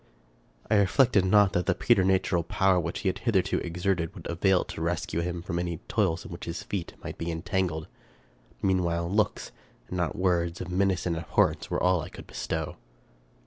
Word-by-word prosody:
I 105 - +3
reflected 100 +1 +4
not 100 0 +5
that 90 -3 0
the - - +3
preternatural 95 -1 +3
power 95 +3 +2
which 85 0 -3
he - - -1
had 95 +1 0
hitherto 110 -5 +1
exerted 85 0 -1
would - - -10
avail 90 +2 +2
to - - -8
rescue 85 -1 -1
him 85 0 -3
from 85 -1 -2
any 85 -1 -2
toils 95 -6 0
in - - -9
which 85 - -7
his 85 0 -5
feet 95 -4 -4
might - - -7
be 85 - -3
entangled. 80 -1 -2 0.8
Meanwhile, 85 -3 +1
looks, 105 +1 0 0.4
and 90 - -3
not 85 -2 -1
words, 85 -2 +1
of 90 - -5
menace 95 -1 +1
and 85 -2 0
abhorrence, 80 -1 +1
were - - 0
all 90 -1 +4
that - - -4
I - - -9
could - - -11
bestow. 80 -1 -4
90 Hz, 185 wpm, -28 LUFS, 85-95 Hz, 0.8 s, not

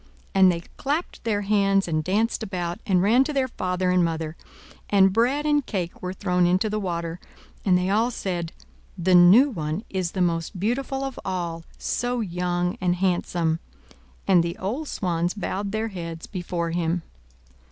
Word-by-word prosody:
And 190 -2 +6
they 170 -1 -3 0.2
clapped 295 +6 -2
their 210 -3 +1
hands 195 -1 +2
and 155 -2 0
danced 215 +7 0
about, 180 -5 -3
and 185 -3 +3
ran 235 +6 +5
to 300 - -3
their 270 -2 +1
father 185 -5 -1
and 180 -1 +4
mother; 160 -1 -2 0.5
and 195 -2 +5
bread 255 +7 +2
and 295 -1 +3
cake 180 -8 -4
were 180 - -3
thrown 180 -2 +1
into 185 +4 +2
the 215 - -1
water; 170 -3 -3 0.4
and 185 -3 +4
they 180 0 0
all 225 +4 +3
said, 175 -8 -3 0.5
"The 185 +1 +2
new 190 +11 +7
one 155 0 -3
is 185 -3 -2
the 185 - -1
most 170 +1 -1
beautiful 270 +6 -1
of 270 -2 -5
all 170 -3 -3
so 245 0 -1
young 180 0 -1
and 180 -1 +2
handsome!" 175 -3 0 0.7
and 185 -3 +6
the 170 0 -3
old 250 +12 -3
swans 175 -4 -1
bowed 200 -1 -3
their 220 +1 -1
heads 165 -4 -6
before 175 -3 -3
him. 170 0 -1
185 Hz, 170 wpm, -24 LUFS, 175-215 Hz, 0.7 s, new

